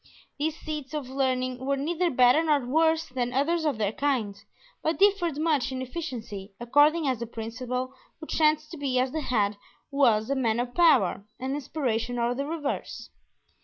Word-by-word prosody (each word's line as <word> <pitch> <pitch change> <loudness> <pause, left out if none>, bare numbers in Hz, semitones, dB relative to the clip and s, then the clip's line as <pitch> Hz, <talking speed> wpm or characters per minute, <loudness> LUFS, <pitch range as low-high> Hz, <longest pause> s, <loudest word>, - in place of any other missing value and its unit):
These 315 +1 -1
seats 305 -2 -5
of 270 -4 -4
learning 255 -2 0
were 275 +1 0
neither 340 +5 0
better 250 +1 +5
nor 300 -5 +2
worse 320 +4 +2
than 250 -1 -2
others 315 +5 +1
of 295 -7 0
their 210 -2 0
kind, 240 -6 -1 0.5
but 320 - 0
differed 385 -6 +3
much 300 -4 +1
in 260 - -4
efficiency, 240 - -6
according 290 +6 +3
as 255 -4 0
the 235 - -4
principal 250 +3 -4 0.3
who 315 - -8
chanced 310 -1 +1
to 335 - -7
be 275 -3 -1
at 255 +1 +1
the 315 - -2
head 210 -6 0 0.3
was 235 -4 +3
a - - +2
man 235 -4 +1
of 245 0 -3
power 295 - +3
and 260 +1 -3
inspiration 250 -5 -2
or 235 0 +1
the 275 +3 -3
reverse. 305 -3 -4
270 Hz, 175 wpm, -27 LUFS, 245-310 Hz, 0.5 s, better